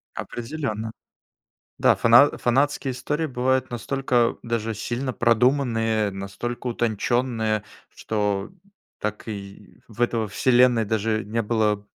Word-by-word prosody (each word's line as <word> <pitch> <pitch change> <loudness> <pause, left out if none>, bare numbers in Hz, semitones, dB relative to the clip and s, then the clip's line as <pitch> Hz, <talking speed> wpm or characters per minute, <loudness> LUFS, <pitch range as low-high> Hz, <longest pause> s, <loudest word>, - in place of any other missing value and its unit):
Определенно. 115 -4 -4 0.9
Да, - - +4
фана 120 +5 +6
фанатские 135 +2 +1
истории 150 +5 -2
бывают 130 -1 0
настолько 120 0 0
даже 115 -1 -2
сильно 125 +5 -3
продуманные, 115 -3 +2
настолько 105 +6 -5
утонченные, 115 -1 0 0.2
что 105 -2 -2 0.5
так 105 0 -4
и 100 -2 -9
в 115 0 -13
этой 115 -2 +1
вселенной 120 +1 +3
даже 110 0 -1
не 115 +3 -1
было 105 -2 0
115 Hz, 105 wpm, -24 LUFS, 110-125 Hz, 0.9 s, фана